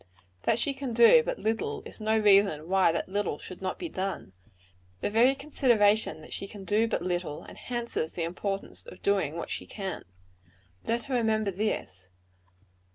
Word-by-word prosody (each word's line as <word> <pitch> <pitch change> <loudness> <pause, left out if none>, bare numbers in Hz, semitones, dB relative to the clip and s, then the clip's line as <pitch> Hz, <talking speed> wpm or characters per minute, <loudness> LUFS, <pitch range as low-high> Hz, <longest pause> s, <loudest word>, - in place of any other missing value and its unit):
That - - +3
she 280 - +1
can 265 -3 -5
do 235 - +7
but - - -3
little, 225 +1 -2
is - - -10
no 220 +1 +2
reason 200 -7 +4
why 190 -2 +4
that 165 - -2
little 195 -5 -1
should 185 +4 -10
not 185 -1 -3
be 355 - -4
done. 190 - -4 0.7
The - - -1
very 245 +5 +5
consideration 220 - +2
that - - -10
she 195 - -3
can 200 -1 -10
do 210 +4 +2
but 200 - -2
little, 175 -4 -3
enhances 235 -9 -4
the 170 - -3
importance 195 +4 -4
of - - -12
doing 190 -7 +1
what 170 - -5
she - - -4
can. 195 -3 -5 0.8
Let 235 +1 0
her 275 - -5
remember 220 -4 +1
this. 175 - -3
205 Hz, 170 wpm, -28 LUFS, 185-230 Hz, 0.8 s, do